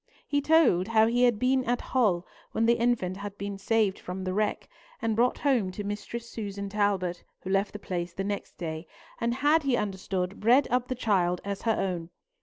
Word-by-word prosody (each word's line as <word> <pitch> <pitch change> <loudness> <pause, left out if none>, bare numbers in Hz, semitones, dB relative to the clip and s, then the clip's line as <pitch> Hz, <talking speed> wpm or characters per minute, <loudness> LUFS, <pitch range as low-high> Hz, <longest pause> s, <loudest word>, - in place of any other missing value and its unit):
He 285 0 +1
told 280 - +4
how 220 -1 +4
he 245 +2 +3
had 240 -3 +3
been 255 +3 +2
at 245 +1 +1
Hull 200 -9 +1 0.3
when 225 - +2
the 235 - +5
infant 230 -6 +1
had 205 0 -7
been 200 0 -5
saved 210 -1 +1
from 185 +1 -6
the 185 0 -2
wreck, 210 +1 -1 0.3
and 225 -1 0
brought 245 +3 +2
home 245 -10 +1
to 205 - -5
Mistress 210 +3 -5
Susan 200 -3 -5
Talbot, 195 -4 0 0.2
who 190 - -5
left 195 +1 +1
the - - -6
place 180 -3 -4
the 190 +3 -4
next 200 0 -4
day, 160 -1 -5 0.3
and 235 0 0
had, 295 +4 +3
he 270 -4 +1
understood, 190 -2 -3
bred 245 +6 +4
up 250 0 +1
the 255 - -2
child 185 -7 +1
as 200 -1 -3
her 225 -1 +1
own. 175 -3 -2
205 Hz, 205 wpm, -28 LUFS, 190-235 Hz, 0.3 s, the